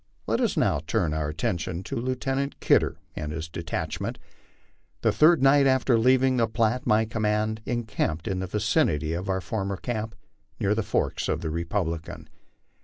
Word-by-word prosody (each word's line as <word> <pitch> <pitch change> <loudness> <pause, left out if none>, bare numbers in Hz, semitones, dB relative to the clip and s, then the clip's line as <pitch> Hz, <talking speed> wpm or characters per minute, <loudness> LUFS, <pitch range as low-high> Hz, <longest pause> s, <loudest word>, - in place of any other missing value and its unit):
Let - - 0
us - - 0
now - - +2
turn 75 - +1
our 75 -1 -1
attention 85 +3 -2
to - - -5
Lieutenant 135 +3 -2
Kidder - - +3 0.2
and 75 -1 -4
his 80 +1 -4
detachment. 80 0 -4 0.8
The - - +3
third 155 -1 +5
night 140 0 +6
after 130 -2 +3
leaving 130 +2 +4
the 115 -2 +3
Platte 115 +3 0
my 110 +1 +4
command 110 0 -1
encamped 105 -9 -2
in 95 -1 -1
the 95 - -3
vicinity 100 - +1
of 90 +3 -4
our 95 0 0
former 100 +2 -3
camp 110 +1 -4 0.4
near 100 - +2
the 110 - 0
forks 105 - -1
of 80 - -1
the 80 -3 -3
Republican. 85 -1 -3
105 Hz, 165 wpm, -26 LUFS, 85-120 Hz, 0.8 s, night